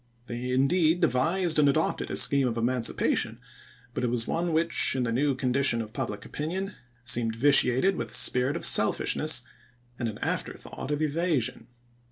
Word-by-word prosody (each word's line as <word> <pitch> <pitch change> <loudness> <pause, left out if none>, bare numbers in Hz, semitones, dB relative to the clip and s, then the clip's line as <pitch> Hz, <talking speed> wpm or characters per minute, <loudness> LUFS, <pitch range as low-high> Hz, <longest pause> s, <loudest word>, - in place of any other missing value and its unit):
They 120 +1 -6
indeed 155 +6 +2
devised 165 +3 0
and 145 -1 +4
adopted 155 +3 -1
a - - -4
scheme 140 -2 +3
of 120 -1 -3
emancipation, 120 0 0 0.5
but 125 - -4
it - - +1
was 115 -1 -2
one 170 +1 -2
which, 165 -3 +3
in 130 - -1
the 115 - -2
new 135 +3 0
condition 130 -1 0
of 110 -1 -6
pubUc 120 -5 -5
opinion, 190 +7 -5 0.3
seemed 120 -2 0
vitiated 140 +6 +3
with - - -5
a - - -12
spirit 125 +3 +1
of - - -2
selfishness 150 -5 +3 0.6
and 120 -2 -2
an 105 - -8
afterthought - - -5
of 150 +1 -1
evasion. 150 -7 -2
135 Hz, 165 wpm, -26 LUFS, 120-155 Hz, 0.6 s, and